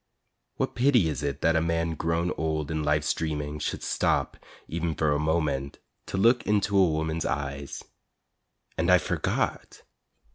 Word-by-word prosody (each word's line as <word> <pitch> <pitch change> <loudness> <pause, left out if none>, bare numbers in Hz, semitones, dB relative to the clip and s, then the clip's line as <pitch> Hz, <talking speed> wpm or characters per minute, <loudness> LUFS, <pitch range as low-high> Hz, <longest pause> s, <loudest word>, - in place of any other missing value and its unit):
What - - -2
pity 120 - +3
it 75 -2 -3
is 70 -2 -1
that 80 0 +3
a 80 - +3
man 85 0 0
grown 85 +2 -1
old 80 -1 -2
in 80 -1 -1
life's 75 0 +1
dreaming 75 -2 -3
Should - - -3
stop, - - 0 0.3
e'en 85 -1 -2
for 75 0 +1
a 75 - +1
moment, 75 -3 -1 0.3
to - - -3
look 115 +5 +4
into 100 -1 +1
a 95 -3 +5
woman's 80 +1 -1
eyes. 70 -1 -4 1.0
And 85 - +1
I 90 - +8
forgot! - - -2
80 Hz, 155 wpm, -27 LUFS, 75-85 Hz, 1.0 s, I